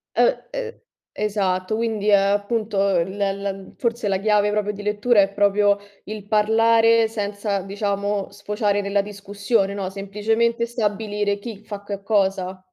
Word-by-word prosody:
Uhm, - - +5 0.3
uhm, 485 -2 -5 0.3
esatto. 195 -2 -1
Quindi, 220 -2 -1
uhm, 205 - +7
appunto, 205 +2 0 0.2
l 190 +4 -3
la 195 -1 -2
forse 235 -2 -1
la 195 -1 +1
chiave 210 0 +2
proprio 210 0 0
di 205 +1 -8
lettura 210 +1 +3
è 195 - +2
proprio 205 0 +3 0.3
il 210 -1 -7
parlare 225 +1 +4
senza, 205 -2 -2
diciamo, 200 0 -2
sfociare 205 0 -1
nella 200 0 +1
discussione, 200 0 -1
no, 195 -2 -3
semplicemente 220 +4 0
stabilire 210 -2 -1
chi 215 -2 -8
fa 205 -1 -7
che 200 -1 -6
cosa. 190 -3 0
205 Hz, 140 wpm, -22 LUFS, 200-215 Hz, 0.3 s, uhm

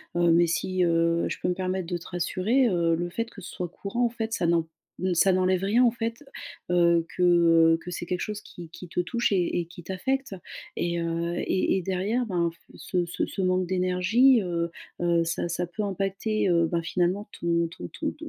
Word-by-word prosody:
heu, 175 -1 +4
mais 170 +1 +5
si, 185 +2 0
heu, 170 0 +2
je - - -4
peux - - -1
me - - +2
permettre 185 0 -2
de 175 - -2
te 170 - -12
rassurer, 190 +8 +1
heu, 170 -4 +2
le 175 +1 -3
fait 230 +6 -3
que 200 - -12
ce 180 - -9
soit 180 - -4
courant 200 +7 -2
en - - +2
fait, 230 -1 -4
heu, - - -4
ça 180 -6 0
n'en 165 -1 +2 0.5
ça 185 +3 +4
n'enlève 185 0 +2
rien 220 +6 +3
en 240 - +6
fait, 230 +2 -4 0.5
heu, 170 -1 +4
que, 180 - +2
heu, 165 -2 +5
que - - -7
c'est 175 0 -5
quelque 180 +1 -2
chose 210 -1 -4
qui 175 -5 -11
qui 180 +2 -10
te 170 - -4
touche 235 +6 0
et 180 -2 +1
et 170 - -2
qui 175 +1 -12
t'affecte 255 +7 -2 0.4
et, 170 0 -1
heu, 170 +1 -2
et 190 - +1
et 190 - -1
derrière 195 +7 -1
ben 170 -4 0
f - - -24 0.2
ce 180 -3 -2
ce 170 - -2
ce 195 - -5
manque 185 0 +1
d'énergie, 185 +8 +3
heu 170 -2 -2 0.3
heu, 170 -1 +2
ça 165 +1 -2
ça 175 - -1
peut 175 +4 -6
impacter, 195 +2 -1
heu, 170 -2 +3
bah 170 0 -1
finalement, 180 +5 0
ton 170 0 +1
ton 90 - -7
ton - - -4
180 Hz, 220 wpm, -26 LUFS, 170-195 Hz, 0.5 s, en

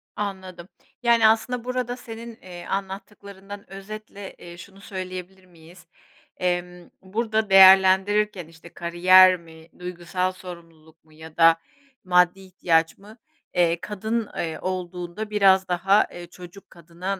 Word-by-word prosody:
Anladım. 190 -4 -6 0.4
Yani, 235 -2 +5
aslında 225 +2 0
burada 250 0 -3
senin, 230 -1 -10
eee, 175 -1 -11
anlattıklarından 200 0 -7
özetle, 200 0 -9
eee, 175 0 -12
şunu 195 +3 -14
söyleyebilir 185 -1 -8
miyiz? 175 +1 -18 0.5
Emm, 180 -1 -3
burada 215 +2 -2
değerlendirirken 190 0 +5
işte 165 +1 -16
kariyer 185 +2 +5
mi, 160 -1 -16
duygusal 180 +1 -3
sorumluluk 165 -3 -14
mu 155 - -24
ya 160 +1 -13
da 165 0 +6 0.5
maddi 180 0 +3
ihtiyaç 170 -4 0
mı? 210 +3 -16 0.4
Eee, 170 -2 +2
kadın, 220 +2 -3
eee, 160 -1 -4
olduğunda 180 +2 -5
biraz 195 -2 +3
daha, 190 +4 +2
eee, 175 0 -9
çocuk 180 +2 -14
kadına 175 +3 -6
185 Hz, 120 wpm, -23 LUFS, 175-200 Hz, 0.5 s, da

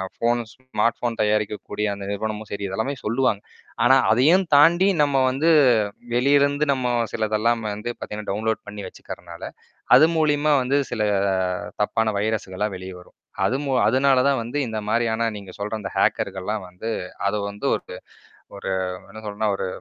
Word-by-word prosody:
Phone 120 +1 +1
smart 120 -3 -1
phone 120 -2 -3
தயாரிக்கக்கூடிய 105 0 -1
அந்த 100 0 -7
நிறுவனமும் 110 +1 -4
சரி 100 0 -4
இதெல்லாமே 110 +9 -2
சொல்லுவாங்க. 115 -2 +1 0.4
ஆனா, 130 +2 +6 0.2
அதையும் 155 - +4
தாண்டி 170 +6 +6 0.2
நம்ம 140 -2 +1
வந்து 140 +6 +1 0.6
வெளியே 135 +4 +4
இருந்து 145 +1 +2
நம்ம 130 -2 -2 0.2
சிலதெல்லாம் 110 +2 0
வந்து 105 +3 -5
பார்த்தீங்கன்னா, 105 0 -7
டவுன்லோட் 110 +2 -1
பண்ணி 105 0 -7
வச்சுக்கிறனால, 85 -1 -10 0.5
அது - - +8
மூலியமா 150 -1 +2
வந்து 130 +3 +1
சில 115 - -2 0.8
தப்பான 110 +1 +1
வைரஸுகளாம் 105 -1 -2
வெளியே 95 0 -8
வரும். 90 - -19 0.3
அது 130 - +1
மூ 140 - -2 0.2
அதனால 130 +3 +3
தான் 135 -3 +1
வந்து 120 +6 -4
இந்த 110 -2 -4
மாரியான 115 0 +1
நீங்க 100 -2 -9
சொல்ற 105 +2 -4
அந்த 95 -2 -5
ஹேக்கர்கள்லாம் 95 +2 0
வந்து 90 +5 -7 0.4
அத 100 +2 +1
வந்து 100 0 -10
ஒருக்கு - - -6 0.6
ஒரு 100 - -5 0.4
என்ன 110 +2 -10
சொல்னா 105 +1 -2
ஒரு 95 - -3
110 Hz, 150 wpm, -23 LUFS, 105-130 Hz, 0.8 s, அது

